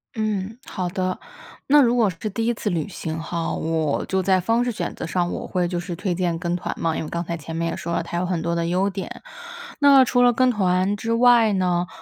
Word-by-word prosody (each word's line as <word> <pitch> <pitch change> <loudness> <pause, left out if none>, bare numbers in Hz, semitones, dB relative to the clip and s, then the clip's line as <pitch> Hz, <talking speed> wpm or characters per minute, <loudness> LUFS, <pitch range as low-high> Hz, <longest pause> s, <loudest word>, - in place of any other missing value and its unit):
嗯， 215 0 -2
好 185 -1 -3
的。 185 0 -2 0.5
那 295 +1 +6
如 240 -1 +3
果 230 -4 +3
是 185 +5 -5
第 225 +3 -2
1 240 - +2
次 210 -2 -3
旅 170 -1 -1
行 160 -4 -5
吼， 165 0 -3
我 160 -2 -1
就 190 0 0
在 190 0 +3
方 225 +6 +1
式 245 - -1
选 215 - -4
择 - - -6
上， 175 0 -1
我 - - -5
会 180 -2 0
就 175 -1 -2
是 175 -1 -5
推 185 +1 -2
荐 175 -1 -1
跟 175 0 -2
团 180 - -3
嘛。 165 -1 0
因 - - -2
为 155 - -6
刚 170 +1 -3
才 170 0 -3
前 160 +1 -7
面 165 0 -1
也 - - -3
说 170 - -5
了， - - 0
它 170 +1 -5
有 185 - -1
很 180 -2 -1
多 170 +1 -1
的 170 0 -1
优 185 +3 +1
点， 195 -1 -7 0.6
那 275 -2 +7
除 245 0 +2
了 245 0 +6
跟 255 +2 +3
团 190 -2 +1
之 225 +3 -2
外 235 -2 +5
呢， 180 -2 +1
185 Hz, 265 characters per minute, -23 LUFS, 170-220 Hz, 0.6 s, 那